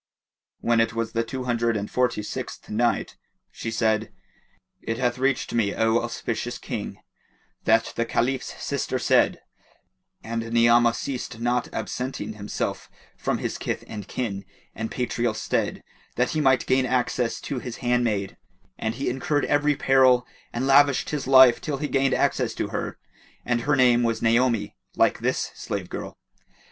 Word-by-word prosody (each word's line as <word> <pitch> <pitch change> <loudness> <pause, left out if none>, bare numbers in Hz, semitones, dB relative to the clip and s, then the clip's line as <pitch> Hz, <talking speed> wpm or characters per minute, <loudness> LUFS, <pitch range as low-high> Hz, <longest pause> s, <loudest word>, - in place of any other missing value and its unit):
When 115 -1 +2
it 115 0 0
was 115 -1 -2
the 115 +1 0
Two 130 +3 -5
Hundred 120 -2 +1
and 100 0 -3
Forty 125 -4 0
sixth - - -6
Night, 115 +2 0 0.3
She - - -5
said, 110 -1 0 0.7
It 115 - -3
hath 125 -1 0
reached 135 0 0
me, 110 -4 +1
O 110 +1 +3
auspicious 120 -1 -3
King, - - -5 0.7
that 115 0 +3
the 115 - +1
Caliph's 125 +3 -1
sister - - -2
said, - - +2 0.8
"And 115 0 -4
Ni'amah 120 0 +5
ceased 125 -3 -5
not 120 +1 0
absenting 125 -4 -4
himself 105 -1 -4 0.3
from - - -1
his - - -4
kith - - -3
and 105 -2 -7
kin 100 -6 -3 0.3
and 110 0 -4
patrial 120 -2 -1
stead, 110 - -2 0.3
that 125 +1 +1
he 155 - 0
might 130 -3 +3
gain 130 0 +2
access 125 -1 0
to 135 - -4
his 120 -1 -7
handmaid, 115 -5 0 0.4
and 110 +1 -2
he 135 - -3
incurred 145 +3 0
every 145 0 +2
peril 130 -2 +4 0.3
and 120 +2 -2
lavished 140 0 +4
his 150 -3 -3
life 130 -3 +7
till 145 -3 -2
he 150 - -2
gained 135 -1 +2
access - - +1
to - - -2
her, - - -4 0.5
and 120 -1 +1
her 145 +4 +2
name 125 -2 +5
was 115 -1 0
Naomi, 115 -1 +2 0.2
like - - +3
this - - -1
slave - - -5
girl. - - -6
120 Hz, 155 wpm, -25 LUFS, 115-130 Hz, 0.8 s, life